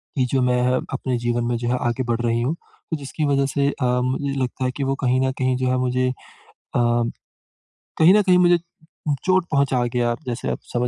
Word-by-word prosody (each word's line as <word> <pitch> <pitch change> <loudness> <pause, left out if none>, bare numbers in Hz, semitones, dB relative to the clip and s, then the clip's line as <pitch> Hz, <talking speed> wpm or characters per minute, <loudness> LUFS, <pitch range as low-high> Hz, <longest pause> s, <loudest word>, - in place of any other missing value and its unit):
कि 130 - +2
जो 135 - +2
मैं 125 0 +2
अ 130 - +1
अपने 125 -2 -1
जीवन 120 0 -1
में 120 0 0
जो 120 0 -4
है 125 - +1
आगे 130 +2 -1
बढ़ 120 0 -1
रही 115 0 0
हूँ। 140 +7 0 0.4
तो 160 - 0
जिसकी 145 +2 -3
वजह 140 -1 +2
से 140 +1 0
अ, - - +2 0.2
मुझे 135 +2 -1
लगता 130 +1 -3
है 125 - 0
कि 140 - -1
वो 135 0 0
कहीं 125 +1 +3
न - - 0
कहीं 130 0 +1
जो 130 0 -1
है 130 - +1
मुझे 130 0 +1
अ, - - -2 0.7
कहीं 120 -1 0 0.8
न 210 - +5
कहीं 185 -2 +4
मुझे 175 -1 +5 0.5
उ 150 - +2
चोट 185 -1 +3
पहुँचा 135 -4 +2
गया। 120 -1 +1
जैसे 120 0 -3
आप - - -3
समझ 125 0 +1
130 Hz, 225 wpm, -22 LUFS, 120-140 Hz, 0.8 s, न